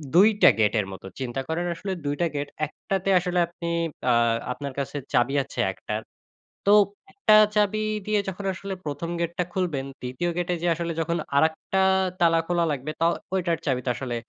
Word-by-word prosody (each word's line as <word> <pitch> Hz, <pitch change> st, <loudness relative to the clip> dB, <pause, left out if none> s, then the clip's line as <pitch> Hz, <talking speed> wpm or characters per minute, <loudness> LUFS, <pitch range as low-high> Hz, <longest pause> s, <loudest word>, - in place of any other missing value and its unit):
২ 200 Hz, +5 st, +8 dB
টা -, -, +9 dB
গেটের 105 Hz, -1 st, +2 dB
মতো। 95 Hz, -, -10 dB
চিন্তা 130 Hz, 0 st, -3 dB
করেন, 165 Hz, +2 st, -1 dB
আসলে 195 Hz, +3 st, -5 dB
২ 145 Hz, 0 st, 0 dB
টা 170 Hz, -, +3 dB
গেট, 145 Hz, 0 st, -2 dB, 0.2 s
১ 150 Hz, -, -11 dB, 0.2 s
টাতে 195 Hz, 0 st, 0 dB
আসলে 180 Hz, 0 st, -1 dB
আপনি 170 Hz, 0 st, -7 dB, 0.4 s
আ -, -, +5 dB, 0.4 s
আপনার 140 Hz, 0 st, -6 dB
কাছে 140 Hz, +1 st, -4 dB, 0.2 s
চাবি 120 Hz, +3 st, +3 dB
আছে -, -, -9 dB
১ 95 Hz, -, -15 dB
টার, 105 Hz, +1 st, -1 dB, 0.6 s
তো 200 Hz, -, +5 dB, 0.4 s
১ -, -, -32 dB
টা 215 Hz, -, +9 dB, 0.2 s
চাবি 210 Hz, 0 st, +2 dB, 0.3 s
দিয়ে 215 Hz, -1 st, +2 dB
যখন 190 Hz, +1 st, -6 dB
আসলে 195 Hz, +2 st, -6 dB
১ম 150 Hz, +3 st, -4 dB
গেটটা 170 Hz, +1 st, -1 dB
খুলবেন, 165 Hz, -8 st, -1 dB, 0.2 s
২য় 125 Hz, +8 st, -2 dB
গেটে 175 Hz, 0 st, 0 dB
যে 175 Hz, -, 0 dB
আসলে 170 Hz, +1 st, -3 dB
যখন 170 Hz, +1 st, -1 dB, 0.2 s
আরেকটা 160 Hz, +5 st, +2 dB, 0.4 s
তালা 165 Hz, -1 st, +4 dB
খোলা 175 Hz, -1 st, +2 dB
লাগবে, 145 Hz, +1 st, -3 dB
ত -, -, +1 dB, 0.3 s
ওইটার 175 Hz, -3 st, +1 dB
চাবি 130 Hz, -4 st, +1 dB
তো -, -, 0 dB
আসলে 125 Hz, -2 st, -4 dB
165 Hz, 190 wpm, -25 LUFS, 135-180 Hz, 0.6 s, টা